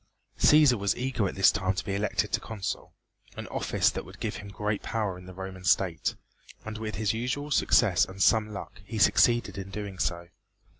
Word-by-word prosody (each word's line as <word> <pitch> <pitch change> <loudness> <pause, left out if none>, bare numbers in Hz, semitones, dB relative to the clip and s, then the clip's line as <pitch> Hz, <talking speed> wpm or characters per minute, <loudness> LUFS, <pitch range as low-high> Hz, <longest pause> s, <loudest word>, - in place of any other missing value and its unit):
Cæsar 150 -6 +6
was 100 -1 +1
eager 125 -5 -1
at - - -5
this 95 - +6
time 95 0 -1
to 100 - -3
be 100 - -3
elected 100 +1 -1
Consul, 105 -4 -5 0.5
an - - -5
office - - +1
that - - -5
would 95 +3 -14
give 110 -3 -3
him 100 - -9
great 105 +1 -3
power 105 -5 -2
in 90 0 -12
the 95 - -9
Roman 95 -1 -7
state, 85 - +1 0.5
and 110 0 -6
with 110 -1 -4
his 110 0 0
usual 125 +6 -3
success 110 -9 +4
and 95 +1 -11
some 105 +2 +3
luck 100 - -8
he 110 +3 -6
succeeded 105 +4 +3
in 95 0 -7
doing 100 -2 -6
so. 85 0 -2
100 Hz, 195 wpm, -28 LUFS, 95-110 Hz, 0.5 s, Cæsar